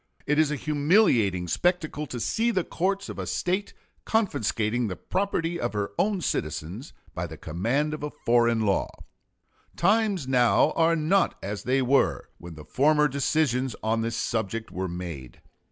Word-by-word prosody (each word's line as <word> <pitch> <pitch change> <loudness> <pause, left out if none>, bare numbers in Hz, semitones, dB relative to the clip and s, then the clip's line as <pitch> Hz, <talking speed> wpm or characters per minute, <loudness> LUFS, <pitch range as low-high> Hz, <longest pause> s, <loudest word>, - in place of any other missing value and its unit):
It 150 +1 +1
is 155 -2 +4
a 150 - -1
humiliating 145 - +2
spectacle 155 - 0
to 125 - -5
see 220 - 0
the 190 -6 +1
courts 195 +4 -2
of - - -7
a - - -4
State 190 +3 -2 0.3
confiscating 120 - 0
the 90 - -4
property 175 - -2
of 120 - -2
her 100 -1 -2
own 200 -2 +1
citizens 85 - -3 0.2
by - - -3
the - - -10
command 120 - -1
of 155 - -5
a 150 - -3
foreign 120 -3 +2
law.... 100 -2 +1 0.9
Times 205 -8 +2
now 125 -2 +4
are 165 0 +3
not 170 +5 +1
as 100 +1 -5
they 130 +1 +2
were 125 - +1
when 85 -1 -10
the 75 -1 -11
former 150 - +3
decisions 135 -3 0
on 110 +1 +1
this 115 0 -2
subject 110 0 -2
were 95 +1 -3
made. 85 -8 -7
130 Hz, 160 wpm, -26 LUFS, 105-165 Hz, 0.9 s, is